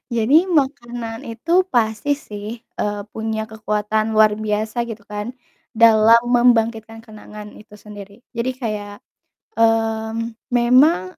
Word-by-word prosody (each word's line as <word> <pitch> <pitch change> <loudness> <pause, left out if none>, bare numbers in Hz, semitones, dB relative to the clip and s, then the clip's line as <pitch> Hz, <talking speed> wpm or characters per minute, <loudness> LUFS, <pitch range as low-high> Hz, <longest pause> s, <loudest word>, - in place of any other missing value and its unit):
Jadi 270 +10 +4
makanan 240 -7 -2
itu 330 +11 +1
pasti 225 - 0
sih, 210 -7 -9 0.4
eee, 205 0 -2
punya 220 0 -3
kekuatan 215 0 -2
luar 215 -1 +5
biasa 215 +2 -2
gitu 210 -2 -9
kan 210 +3 -6 0.4
dalam 225 0 +6
membangkitkan 230 -2 +1
kenangan 210 -1 -12
itu 210 0 -15
sendiri, 205 +1 -13
jadi 235 +1 -2
kayak, 210 -5 -5 0.6
mmm, 225 0 0 0.2
memang 240 - +3
225 Hz, 115 wpm, -20 LUFS, 215-235 Hz, 0.6 s, dalam